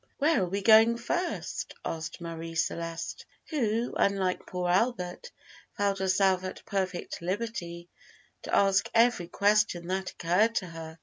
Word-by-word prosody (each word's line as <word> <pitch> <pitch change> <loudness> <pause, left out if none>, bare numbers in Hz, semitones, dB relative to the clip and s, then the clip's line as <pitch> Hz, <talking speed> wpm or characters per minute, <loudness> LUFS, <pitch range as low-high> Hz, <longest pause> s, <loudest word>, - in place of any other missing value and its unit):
"Where 305 -1 +3
are 180 - -1
we 200 +2 -2
going 225 +2 +7
first?" 345 +10 -3
asked 160 +1 -5
Marie 165 0 -6
Celeste, 165 0 -3 0.3
who, 235 -5 0
unlike 195 -2 0
poor 180 -1 -3
Albert, 185 - 0 0.5
felt 200 -1 +1
herself 190 0 +2
at 185 - -7
perfect 190 -4 -3
liberty 175 -3 -4 0.5
to - - -2
ask 195 -1 +3
every 230 -6 +4
question 205 -2 +2
that 190 0 -1
occurred 195 +7 +1
to 185 - 0
her. 165 -1 -9
190 Hz, 135 wpm, -29 LUFS, 175-220 Hz, 0.5 s, going